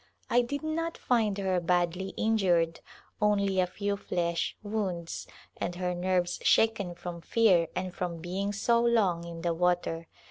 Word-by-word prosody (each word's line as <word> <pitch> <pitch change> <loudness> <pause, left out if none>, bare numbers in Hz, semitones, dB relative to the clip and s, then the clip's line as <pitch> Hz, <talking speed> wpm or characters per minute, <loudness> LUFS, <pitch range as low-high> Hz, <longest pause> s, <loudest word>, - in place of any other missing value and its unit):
I 245 - +5
did 285 +5 -4
not 330 +1 -2
find 220 -5 +1
her 190 -2 +1
badly 175 +2 0
injured 180 -7 +2 0.2
— - - -33
only 200 -2 +2
a 180 - +3
(tw 200 +2 -2
flesh 170 -3 -1
wounds, 195 -6 -3 0.3
and 175 - -3
her 180 0 -1
nerves 180 0 0
shaken 205 -6 +3
from 170 -1 -7
fear 185 -4 +3
and 185 0 -3
from 175 -2 -3
being 185 +4 -3
so 235 +3 +2
long 200 -8 +2
in 165 -1 -7
the 170 -1 +1
water. 170 -1 0
185 Hz, 155 wpm, -29 LUFS, 175-210 Hz, 0.3 s, I